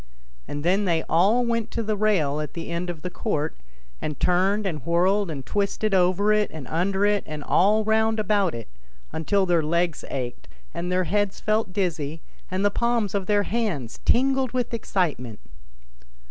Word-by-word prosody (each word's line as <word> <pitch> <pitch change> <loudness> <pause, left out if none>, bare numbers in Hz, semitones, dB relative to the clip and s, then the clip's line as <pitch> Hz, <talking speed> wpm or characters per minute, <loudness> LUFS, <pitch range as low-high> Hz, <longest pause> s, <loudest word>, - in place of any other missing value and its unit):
And 145 0 -5
then 195 +4 +2
they 165 -3 +1
all 200 +9 +3
went 230 -2 -1
to 230 - -3
the 215 0 -1
rail 185 -9 +1
at 150 - -6
the 170 0 -5
end 170 +1 -2
of 165 -3 -6
the 180 - -4
court 160 -6 -2 0.5
and 150 -2 -4
turned 190 +4 +2
and 165 -6 -3
whirled 185 +4 +2
and 140 -4 -5
twisted 205 +1 -1
over 190 +3 +3
it 210 -1 +2
and 150 -5 -8
under 190 +5 +1
it 205 0 +2
and 150 -1 -6
all 210 +8 +3
round 220 +1 +2
about 205 - +1
it, 115 - -7 0.4
until 190 +5 +1
their 175 -2 +3
legs 170 +1 0
ached 125 -7 -5 0.3
and 175 +1 -3
their 185 0 +2
heads 205 +2 0
felt 215 -2 0
dizzy, 165 -6 -2 0.3
and 190 +2 -1
the 205 - +3
palms 235 -3 0
of 195 -2 -2
their 205 -1 +3
hands 190 - -2
tingled 265 0 +2
with 250 -2 -1
excitement. 150 - -2
190 Hz, 175 wpm, -24 LUFS, 165-210 Hz, 0.5 s, all